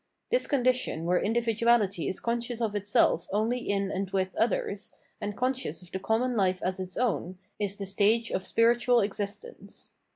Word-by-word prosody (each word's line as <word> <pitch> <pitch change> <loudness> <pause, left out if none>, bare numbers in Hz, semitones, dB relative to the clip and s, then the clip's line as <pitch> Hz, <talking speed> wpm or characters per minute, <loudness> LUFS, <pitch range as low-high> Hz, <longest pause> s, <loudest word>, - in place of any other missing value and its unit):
This - - +2
condition 255 - +1
where 180 +1 +3
individuality 225 -4 +2
is 190 - -2
conscious 235 0 -2
of 225 -3 -1
itself 205 -4 +2
only 220 +5 +1
in 200 -4 -1
and 195 0 -2
with 190 -1 -1
others, 210 -2 -1 0.3
and 205 0 -4
conscious 255 - -1
of 175 - -15
the 190 - -3
common 235 +5 0
life 185 -3 +2
as 185 +1 -1
its 185 -1 -5
own, 195 -7 -1 0.2
is 200 -1 -1
the 200 - -5
stage 210 +4 +2
of 185 - -1
spiritual 235 +2 +3
existence. 205 - -5
210 Hz, 165 wpm, -28 LUFS, 190-235 Hz, 0.3 s, where